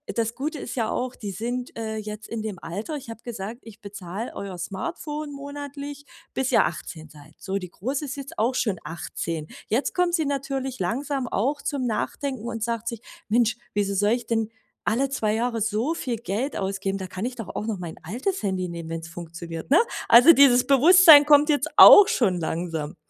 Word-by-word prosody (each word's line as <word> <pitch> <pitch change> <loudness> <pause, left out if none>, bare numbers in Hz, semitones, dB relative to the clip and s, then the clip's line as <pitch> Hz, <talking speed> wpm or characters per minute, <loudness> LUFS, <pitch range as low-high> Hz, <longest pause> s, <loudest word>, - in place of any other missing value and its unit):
das 230 0 -1
Gute 295 +2 -4
ist 250 - -6
ja 225 -3 -1
auch, 255 0 -3
die 205 -3 -6
sind, 245 +5 -4
äh, 220 -1 -4
jetzt 215 0 -7
in 225 -2 -5
dem 205 -5 -5
Alter 205 - -5
ich 260 -5 -8
habe 225 0 -9
gesagt, 225 0 -6
ich 225 -1 -14
bezahle 200 +2 -7
euer 195 -2 -6
Smartphone 295 - -5
monatlich, 285 0 -8 0.3
bis 265 0 -1
ihr - - +5
18 155 -2 -6
seid. 150 +1 -16
So, 195 0 -3
die 180 -2 -7
Große 275 - -3
ist 280 - -5
jetzt 280 +4 -9
auch 240 +4 +1
schon 210 -8 0
18. 160 0 -5 0.2
Jetzt 240 +6 0
kommt 360 -1 +1
sie 320 -3 0
natürlich 270 -2 -3
langsam 265 +6 -2
auch 275 +8 -1
zum 275 -4 -2
Nachdenken 240 +1 -3
und 225 -2 -4
sagt 230 0 -3
sich: 235 -1 -4 0.3
„Mensch, 230 0 +2 0.2
wieso 200 -1 0
soll 205 +2 +2
ich 240 0 -1
denn 225 -1 0 0.4
alle 255 +5 +1
2 215 -6 -1
Jahre 230 0 -1
so 225 +9 0
viel 245 -7 -3
Geld 230 +6 -3
ausgeben? 195 0 -2
Da 190 - -5
kann 190 +5 -5
ich 250 0 -4
doch 225 -6 -7
auch 215 - -3
noch 215 -5 -3
mein 170 -2 -7
altes 255 - -3
Handy 185 -2 -1
nehmen, 170 -1 -7
wenn's 165 0 -6
funktioniert”, 170 0 -8
ne? 320 - +7 0.3
Also, 245 +8 +9
dieses 255 -3 +6
Bewusstsein 300 +2 +8
kommt 295 +1 +5
jetzt 290 0 +2
auch 410 -1 +11
schon 190 -8 +1
langsam. 160 -2 -3
230 Hz, 195 wpm, -24 LUFS, 195-275 Hz, 0.4 s, auch